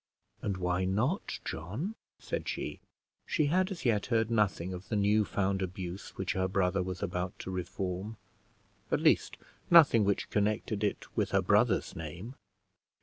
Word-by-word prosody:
"And 100 Hz, -2 st, -2 dB
why 90 Hz, 0 st, 0 dB
not, 110 Hz, -, 0 dB
John?" 105 Hz, -, -4 dB, 0.2 s
said -, -, -4 dB
she. -, -, -4 dB, 0.5 s
She 155 Hz, -, +2 dB
had 185 Hz, +1 st, +3 dB
as 190 Hz, -7 st, -6 dB
yet 110 Hz, -4 st, +2 dB
heard 115 Hz, -2 st, +1 dB
nothing 95 Hz, -5 st, +1 dB
of 90 Hz, +1 st, -8 dB
the 110 Hz, -, 0 dB
new 105 Hz, +1 st, +3 dB
found 95 Hz, 0 st, 0 dB
abuse 95 Hz, 0 st, -5 dB
which -, -, -1 dB
her 95 Hz, 0 st, 0 dB
brother 95 Hz, 0 st, +1 dB
was 90 Hz, 0 st, -4 dB
about 90 Hz, +1 st, -3 dB
to 95 Hz, -, -6 dB
reform; 95 Hz, +3 st, -4 dB, 0.7 s
at -, -, +3 dB
least -, -, +3 dB, 0.3 s
nothing 150 Hz, -10 st, +7 dB
which 100 Hz, 0 st, 0 dB
connected 105 Hz, 0 st, 0 dB
it 105 Hz, -, -1 dB
with -, -, +1 dB
her -, -, +3 dB
brother's -, -, +2 dB
name. 85 Hz, -, -7 dB
100 Hz, 155 wpm, -31 LUFS, 90-110 Hz, 0.7 s, nothing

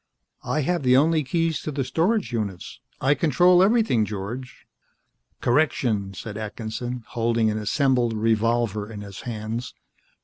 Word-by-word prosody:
"I 155 Hz, -, -1 dB
have 175 Hz, +4 st, 0 dB
the 125 Hz, -1 st, +4 dB
only 155 Hz, +2 st, +3 dB
keys 165 Hz, +3 st, 0 dB
to 155 Hz, -, -4 dB
the 140 Hz, -1 st, -1 dB
storage 180 Hz, -, 0 dB
units. 100 Hz, -6 st, -4 dB, 0.2 s
I 135 Hz, +2 st, +3 dB
control 175 Hz, +5 st, +4 dB
everything, 210 Hz, -, +3 dB
George." 105 Hz, +5 st, -6 dB, 0.8 s
"Correction," 120 Hz, -8 st, +1 dB
said 105 Hz, +2 st, -7 dB
Atkinson, 110 Hz, +3 st, -5 dB
holding 115 Hz, -2 st, +1 dB
an 110 Hz, -, -2 dB
assembled 125 Hz, +2 st, +1 dB
revolver 110 Hz, -1 st, 0 dB
in 105 Hz, -2 st, -7 dB
his 100 Hz, -1 st, -9 dB
hands. 115 Hz, +2 st, -5 dB
120 Hz, 135 wpm, -24 LUFS, 110-145 Hz, 0.8 s, the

